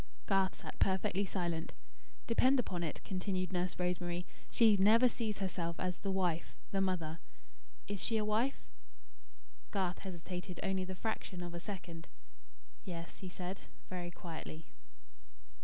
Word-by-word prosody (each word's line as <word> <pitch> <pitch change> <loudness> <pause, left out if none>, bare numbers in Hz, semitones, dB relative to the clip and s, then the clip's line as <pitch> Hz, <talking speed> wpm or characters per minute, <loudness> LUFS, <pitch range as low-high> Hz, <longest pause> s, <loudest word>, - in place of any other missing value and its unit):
Garth 195 -2 +3
sat - - -8
perfectly 190 +1 +3
silent. 170 -4 -1 0.5
"Depend 255 +3 +5
upon 180 -7 -1
it," 160 -3 -3
continued 185 -1 -1
Nurse 180 -1 0
Rosemary, 180 0 0 0.2
"she 225 -3 +7
never 220 +6 +7
sees 220 -3 -1
herself 175 -3 -1
as 180 -1 -1
'The 200 - -2
Wife' 180 -4 +1 0.2
'The 195 - +2
Mother.' 170 -4 0 0.7
Is 205 -2 -3
she 225 - +2
a 215 - +2
wife?". 225 +6 +1 1.0
Garth 190 -3 0
hesitated 180 -1 -5
only 190 -1 +1
the 185 0 -4
fraction 185 -3 -2
of 175 -1 -5
a 170 - -3
second. 175 -4 -6 0.8
"Yes," 170 -3 -6
he 185 - -5
said, 185 +1 -4 0.3
very 175 -1 -2
quietly. 160 -2 -7
185 Hz, 140 wpm, -36 LUFS, 175-200 Hz, 1.0 s, she